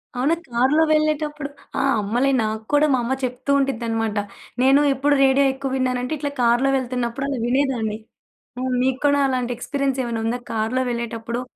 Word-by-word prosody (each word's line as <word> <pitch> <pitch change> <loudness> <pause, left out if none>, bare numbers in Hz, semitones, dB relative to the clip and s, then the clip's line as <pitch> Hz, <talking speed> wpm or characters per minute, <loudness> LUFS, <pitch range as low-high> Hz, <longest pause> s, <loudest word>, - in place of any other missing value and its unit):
అవునా! 275 +7 +2
కార్‌లో 260 +7 +3
వెళ్ళేటప్పుడు, 305 -1 0 0.3
ఆ! - - +1 0.2
అమ్మలే 240 +7 +1
నాక్కూడా 220 +7 +1
మా 255 - +2
అమ్మ 250 - -1
చెప్తూ 250 +2 -4
ఉండిద్దన్నమాట. 225 -5 -1 0.4
నేను 270 +3 +5
ఎప్పుడు 285 +2 +2
రేడియో 270 +1 +4
ఎక్కువ 270 0 -4
విన్నానంటే 255 +1 -1
ఇట్లా 285 0 -3
కార్‌లో 240 +3 +3
వెళ్తున్నప్పుడు 250 0 -3
అలా 270 - -2
వినేదాన్ని. 245 -4 0 0.6
ఆ! - - -3 0.2
మీకూడా 285 +2 +2
అలాంటి 250 -2 -1
ఎక్స్పీరియన్స్ 275 +1 -2
ఏమైనా 230 -2 -3
ఉందా? 240 +2 -1
కార్‌లో 225 +4 0
వెళ్ళేటప్పుడు 235 0 -4
255 Hz, 145 wpm, -22 LUFS, 235-275 Hz, 0.6 s, నేను